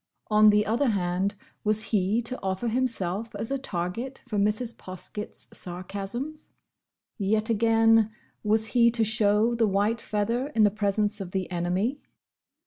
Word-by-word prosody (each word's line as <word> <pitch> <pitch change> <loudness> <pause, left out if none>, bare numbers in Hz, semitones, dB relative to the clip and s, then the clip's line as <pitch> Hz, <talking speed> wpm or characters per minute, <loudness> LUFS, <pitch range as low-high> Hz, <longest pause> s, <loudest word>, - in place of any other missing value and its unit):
On 215 0 +7
the 210 0 +4
other 240 +6 +1
hand 190 -1 0 0.3
was 215 0 +2
he 210 +4 +2
to 255 +2 -6
offer 190 +5 -1
himself 225 -4 -1
as 225 - -4
a 275 - 0
target 230 +5 -4
for 215 -4 -1
Mrs. 215 +4 0
Poskett's 185 +3 -7
sarcasms? 200 - -6 0.7
Yet 215 +3 +1
again, 225 0 +4 0.3
was 220 +1 +2
he 235 -1 +6
to 230 -1 +1
show 215 +1 +2
the 230 -2 +2
white 205 +4 +1
feather 230 +5 -1
in 220 - +5
the 205 - +5
presence 205 0 0
of 185 -2 -7
the 190 -2 -1
enemy? 180 +10 -1
215 Hz, 145 wpm, -27 LUFS, 195-230 Hz, 0.7 s, On